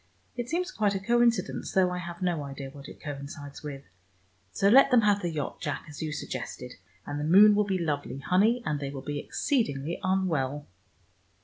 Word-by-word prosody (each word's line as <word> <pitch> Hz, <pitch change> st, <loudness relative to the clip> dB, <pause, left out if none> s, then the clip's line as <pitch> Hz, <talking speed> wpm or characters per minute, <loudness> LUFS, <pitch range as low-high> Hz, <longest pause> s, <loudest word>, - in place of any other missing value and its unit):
It 240 Hz, -1 st, -4 dB
seems 360 Hz, +3 st, -1 dB
quite 205 Hz, -2 st, +1 dB
a -, -, -1 dB
coincidence, 235 Hz, +3 st, +1 dB
though 185 Hz, -1 st, +3 dB
I 180 Hz, -, -3 dB
have 175 Hz, 0 st, -7 dB
no 175 Hz, -4 st, 0 dB
idea 135 Hz, -1 st, -7 dB
what 140 Hz, 0 st, -11 dB
it -, -, -12 dB
coincides 145 Hz, 0 st, -8 dB
with. 140 Hz, -2 st, -7 dB, 0.7 s
So 195 Hz, -, +1 dB
let 265 Hz, +7 st, +7 dB
them 250 Hz, -3 st, +5 dB
have 205 Hz, -1 st, +3 dB
the 175 Hz, -, -1 dB
yacht, 150 Hz, -4 st, -4 dB
Jack, 145 Hz, -3 st, -3 dB
as 150 Hz, -1 st, -9 dB
you 155 Hz, -1 st, -2 dB
suggested, 125 Hz, -3 st, -6 dB, 0.3 s
and 145 Hz, -, -4 dB
the -, -, -2 dB
moon 200 Hz, +7 st, +7 dB
will 210 Hz, 0 st, +2 dB
be 195 Hz, -2 st, 0 dB
lovely, 145 Hz, -6 st, -2 dB
honey, 200 Hz, -, +2 dB
and 150 Hz, -1 st, -1 dB
they 140 Hz, -1 st, -4 dB
will 135 Hz, -1 st, -7 dB
be 145 Hz, +1 st, -3 dB
exceedingly 170 Hz, -, -1 dB
unwell!" 160 Hz, -8 st, 0 dB
170 Hz, 195 wpm, -28 LUFS, 145-205 Hz, 0.7 s, let